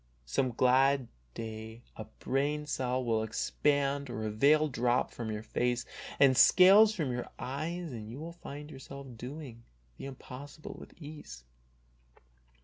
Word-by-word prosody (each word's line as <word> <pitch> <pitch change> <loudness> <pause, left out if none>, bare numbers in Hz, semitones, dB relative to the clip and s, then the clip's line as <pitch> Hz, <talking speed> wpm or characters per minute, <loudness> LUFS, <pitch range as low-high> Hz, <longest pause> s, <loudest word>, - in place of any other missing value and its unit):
Some 125 - 0
glad 130 +1 +3 0.3
day 110 +1 -7
a 110 - -7
brain 145 +7 -2
cell 130 -3 -1
will 115 -2 +1
expand 140 +5 0
or 110 -2 -4
a 110 - -2
veil 150 +8 +4
drop 125 -2 +1
from 115 -2 -5
your 105 0 -4
face 120 +2 -1 0.3
and 135 -2 +6
scales 195 - +7
from 155 -9 -1
your 125 0 -4
eyes 160 +5 -4
and 110 -3 -7
you 120 - -7
will 165 +2 -6
find 150 -3 -9
yourself 140 0 -9
doing 125 0 -8 0.4
the - - -6
impossible 140 +3 -9
with - - -14
ease. 145 - -10
130 Hz, 145 wpm, -31 LUFS, 115-150 Hz, 0.4 s, scales